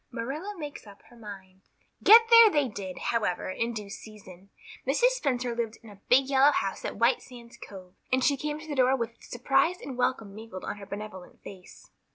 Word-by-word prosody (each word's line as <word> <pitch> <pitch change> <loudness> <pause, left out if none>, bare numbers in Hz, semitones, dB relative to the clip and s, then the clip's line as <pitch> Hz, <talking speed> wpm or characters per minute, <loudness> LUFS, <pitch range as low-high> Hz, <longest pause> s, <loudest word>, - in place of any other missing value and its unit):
Marilla 275 - -5
Makes 295 -8 -8
Up 200 -1 -15
Her - - -16
Mind 195 -4 -12 0.4
GET 450 +3 +9
there 460 -1 +9
they 295 -7 +1
did, 195 -4 -7
however, 210 -6 -2
in 230 +5 -2
due 210 -3 -7
season. 200 -3 -12 0.4
Mrs. 390 - +3
Spencer 255 - -2
lived 230 -2 -3
in 220 - -13
a 200 -1 -17
big 265 +2 +5
yellow 275 +1 +5
house 195 -8 -3
at - - -5
White 235 +3 +2
Sands 240 -2 -14
Cove, 185 -2 -12 0.2
and 260 0 +2
she 285 - +3
came 295 +2 -4
to 315 - -12
the 300 - -4
door 260 -1 +3
with 230 -1 -6
surprise 270 +8 0
and 270 - -8
welcome 225 -5 -1
mingled 215 -3 -9
on - - -5
her 200 -1 -11
benevolent 200 -2 -9
face. 185 -2 -13
235 Hz, 200 wpm, -27 LUFS, 205-275 Hz, 0.4 s, GET